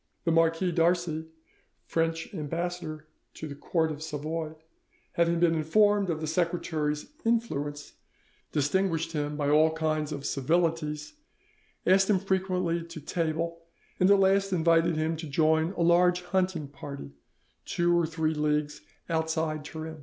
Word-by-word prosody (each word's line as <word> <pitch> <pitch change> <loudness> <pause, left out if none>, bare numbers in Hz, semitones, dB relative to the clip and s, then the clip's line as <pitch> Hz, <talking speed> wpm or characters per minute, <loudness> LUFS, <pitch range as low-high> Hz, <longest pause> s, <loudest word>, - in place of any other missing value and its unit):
The 165 - +1
Marquis 165 +2 +2
d'Arcy, 165 -1 +1 0.6
French 165 0 -1
ambassador 165 0 -4 0.3
to 160 - -6
the 145 - -6
court 160 +3 0
of 150 0 -7
Savoy, 155 +1 -4 0.6
having 170 0 +2
been 170 -1 +4
informed 200 +5 +3
of 160 -2 -2
the - - -2
secretary's 155 -2 -1 0.2
influence, 150 -12 -1 0.6
distinguished 165 +2 0
him 150 -2 -2
by 145 -1 0
all 155 +1 +5
kinds 155 -1 -1
of 140 -2 -5
civilities, 155 - 0 0.7
asked 190 +2 +4
him 205 - +5
frequently 185 -3 0
to 170 -1 -9
table, 165 +2 -2 0.4
and 185 - +4
at 200 - +7
last 195 0 +3
invited 165 -1 +3
him 155 +1 0
to 160 0 -6
join 160 +3 +2
a - - -3
large 180 +1 +4
hunting 180 -4 -1
party 140 - -8 0.5
two 175 0 +1
or 170 -2 +2
three 160 -1 -1
leagues 150 -1 -1 0.3
outside 160 -2 -1
Turin. 160 +1 -7
165 Hz, 140 wpm, -28 LUFS, 155-175 Hz, 0.7 s, at